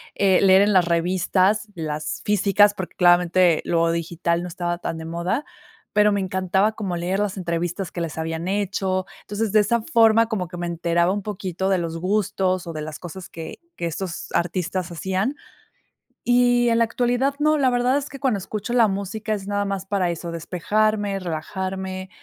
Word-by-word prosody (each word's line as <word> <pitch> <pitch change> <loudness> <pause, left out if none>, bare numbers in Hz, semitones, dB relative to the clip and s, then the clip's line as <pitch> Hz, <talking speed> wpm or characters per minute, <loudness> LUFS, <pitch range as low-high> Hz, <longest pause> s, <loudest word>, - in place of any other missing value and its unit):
eh, 195 -2 +3
leer 190 0 +6
en 205 0 +2
las 185 -2 +5
revistas 185 +4 +1
las 155 -2 -4
físicas, 205 0 +4
porque 185 -3 -7
claramente 175 -1 +4
lo 165 -1 +2
digital 170 +1 -1
no 180 - -5
estaba 175 0 -3
tan 165 - -4
de 160 - -7
moda, 170 - -2 0.5
pero 210 0 +4
me 200 - +1
encantaba 190 +2 +1
como 200 -5 -4
leer 180 +3 -1
las 205 -1 -1
entrevistas 175 +1 -3
que 175 - -4
les 165 -2 -4
habían 160 +1 -3
hecho. 190 -1 -1 0.2
Entonces 210 +1 -3
de 215 - +5
esa 220 +3 +2
forma, 230 -4 +4
como 205 -6 -2
que 175 +1 -9
me 175 0 -3
enteraba 170 +1 +1
un 205 - -2
poquito 190 -2 -3
de 190 - +3
los 165 -1 -3
gustos 185 -1 0
o 165 - -6
de 155 - -5
las 155 -1 -6
cosas 180 +1 -9
que 160 -1 -8 0.2
que 170 - -4
estos 170 +2 -4
artistas 180 +1 -1
hacían. 190 - -1 0.9
Y 245 0 +4
en 230 - +3
la 230 - +5
actualidad 245 +4 0
no, 305 +1 +3
la 270 -3 +3
verdad 245 +2 +2
es 285 -1 -3
que 275 - -9
cuando 255 -7 +1
escucho 210 +3 -5
la 235 -3 +5
música 200 +3 -3
es 200 -2 -5
nada 205 0 0
más 195 -1 -3
para 190 -3 0
eso. 170 0 -4
Despejarme, 205 +4 0
relajarme 185 +2 -4
190 Hz, 185 wpm, -23 LUFS, 175-210 Hz, 0.9 s, leer